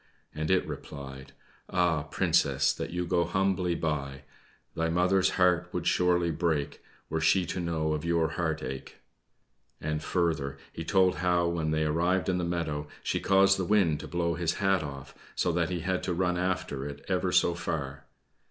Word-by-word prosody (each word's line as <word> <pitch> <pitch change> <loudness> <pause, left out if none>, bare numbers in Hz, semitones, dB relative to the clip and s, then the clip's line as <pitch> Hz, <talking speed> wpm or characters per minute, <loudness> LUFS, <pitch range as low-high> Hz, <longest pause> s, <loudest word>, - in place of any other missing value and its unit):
and 80 +1 -3
it 95 -1 +3
replied: 70 -1 -8 0.4
"Ah, 85 -3 +2
Princess, 80 - +2
that - - -5
you 90 +1 -2
go 85 0 +2
humbly 90 0 0
by! 70 -4 -3 0.5
Thy 80 0 -1
mother's 90 +3 +3
heart 90 -1 +3
would 90 -2 -3
surely 90 -1 +2
break 80 -3 -1 0.3
Were 80 0 -2
she 90 +3 +3
to 90 - -4
know 80 -3 -1
of 75 0 -3
your 85 -2 +1
heart 80 -1 -2
ache!" 65 +1 -6 0.8
And, 75 0 -2
further, 80 -6 -1 0.2
he 80 - -5
told 95 +1 +3
how 90 -1 +2
when 80 -2 -1
they 80 0 +1
arrived 85 +3 +1
in 90 -1 +1
the - - -1
meadow, 80 -4 -2 0.2
she - - 0
caused 95 0 +4
the - - 0
wind 90 -7 +3
to - - -7
blow 85 +2 0
his 85 0 -1
hat 95 -1 +2
off, 70 -2 -7 0.2
so 90 - +1
that 85 -1 0
he 90 -2 -2
had 90 +2 -1
to 90 - -2
run 90 0 +1
after 90 -6 -2
it 70 0 -9
ever - - 0
so 85 - +4
far. 75 -5 -4
85 Hz, 180 wpm, -29 LUFS, 75-90 Hz, 0.8 s, caused